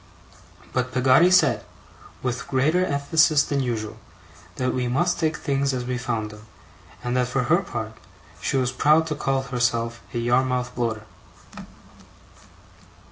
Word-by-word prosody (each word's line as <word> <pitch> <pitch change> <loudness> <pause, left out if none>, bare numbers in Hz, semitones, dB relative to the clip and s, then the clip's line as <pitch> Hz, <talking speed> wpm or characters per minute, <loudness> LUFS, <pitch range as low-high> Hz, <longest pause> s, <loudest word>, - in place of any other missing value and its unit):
But 125 0 -1
Peggotty 130 +6 +5
said, 185 - +4 0.6
with 125 +1 -3
greater 150 +7 +2
emphasis 150 0 +3
than 140 - -1
usual, 115 -4 -3 0.6
that 130 -1 -1
we 125 -1 -1
must 155 +9 +1
take 155 -2 0
things 140 -1 0
as 125 -1 -3
we 125 0 -2
found 115 -4 -3
them, 105 0 -13 0.6
and 125 0 -2
that, 125 -1 +2
for 125 +1 0
her 160 +8 +3
part, 110 - -5 0.5
she 135 - 0
was 125 -1 +1
proud 150 +5 +3
to 155 -2 -3
call 135 -2 -1
herself 115 -2 -1
a - - -4
Yarmouth 125 +1 +1
Bloater. 115 -3 -2
130 Hz, 140 wpm, -24 LUFS, 120-140 Hz, 0.6 s, Peggotty